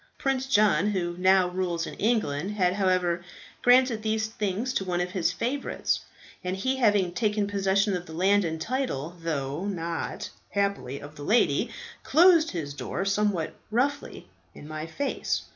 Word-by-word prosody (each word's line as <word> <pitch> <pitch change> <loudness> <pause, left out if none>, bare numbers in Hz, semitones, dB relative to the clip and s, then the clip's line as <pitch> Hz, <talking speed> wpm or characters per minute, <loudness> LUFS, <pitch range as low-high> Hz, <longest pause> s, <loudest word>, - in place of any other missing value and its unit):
Prince 265 -1 -1
John, 205 -7 +4
who 175 -4 -1
now 185 0 +4
rules 180 -2 -2
in - - -7
England, 205 -6 0
had 180 -3 +2
however 185 -3 +1 0.4
granted 245 -2 +4
these 220 0 0
things 220 +3 -2
to - - 0
one 180 -2 -1
of 180 0 -2
his 180 -2 +1
favourites, 245 +10 -1 0.4
and 180 +1 -2
he 260 +7 0
having 205 -7 +3
taken 210 0 +1
possession 200 0 +1
of 180 0 -5
the 160 - -9
land 195 +4 +3
and 160 -2 -3
title, 175 - -2
though 155 +2 -2
not, 170 -4 -4 0.2
happily, 200 -10 -1
of 145 +2 -11
the 145 - -7
lady, 220 +10 +2 0.3
closed 330 +1 +5
his 150 -6 -4
door 180 +6 -4
somewhat 195 -4 0 0.2
roughly 255 +6 -1 0.3
in 150 - -11
my 155 +1 -5
face. 280 - -2
195 Hz, 160 wpm, -27 LUFS, 175-220 Hz, 0.4 s, closed